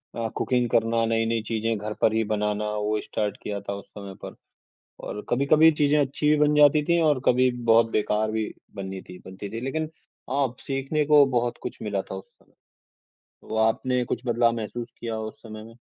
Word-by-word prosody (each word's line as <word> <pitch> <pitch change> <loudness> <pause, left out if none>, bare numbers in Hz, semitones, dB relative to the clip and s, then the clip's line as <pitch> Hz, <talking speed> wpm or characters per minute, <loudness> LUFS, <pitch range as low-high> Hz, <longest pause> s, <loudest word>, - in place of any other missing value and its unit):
अ, 115 -1 -2
cooking 125 -2 0
करना, 115 0 +2
नई-नई 115 0 0
चीजें 115 0 -1
घर 105 +1 -5
पर 110 - +4
ही 110 0 +2
बनाना 105 0 0
वो 105 0 0
स्टार्ट 105 -2 -3
किया 100 -1 -3
था 100 0 -5
उस 100 - -8
समय 100 -1 -7
पर - - -7 0.7
और 105 - -6
कभी-कभी 150 +5 +5
चीज़ें 145 +1 +4
अच्छी 145 +2 0
भी 150 - +5
बन 150 0 +3
जाती 150 0 +6
थीं 170 +2 +2
और 150 -4 +3
कभी 125 +1 +4 0.2
बहुत 115 0 +5
बेकार 110 0 0
भी 110 -1 -1 0.3
बन्नी 95 -1 -5
थीं 90 - -10
बनती 95 +2 -7
थीं। 115 - -5
लेकिन 155 +4 -2 0.4
हाँ, 135 -3 0
सीखने 135 +3 -1
को 150 -1 +7
बहुत 120 -2 -1
कुछ - - -6
मिला 100 -3 -2
था - - -8
उस 95 - -8
समय। - - -31 1.0
तो 110 - -3
आपने 125 +2 0
कुछ 120 - -2
बदलाव 120 0 +3
महसूस 115 +2 -5
किया 115 -1 -4
उस 110 0 -7
समय 110 -1 -9
में? 115 +1 -14
115 Hz, 195 wpm, -25 LUFS, 105-135 Hz, 1.0 s, को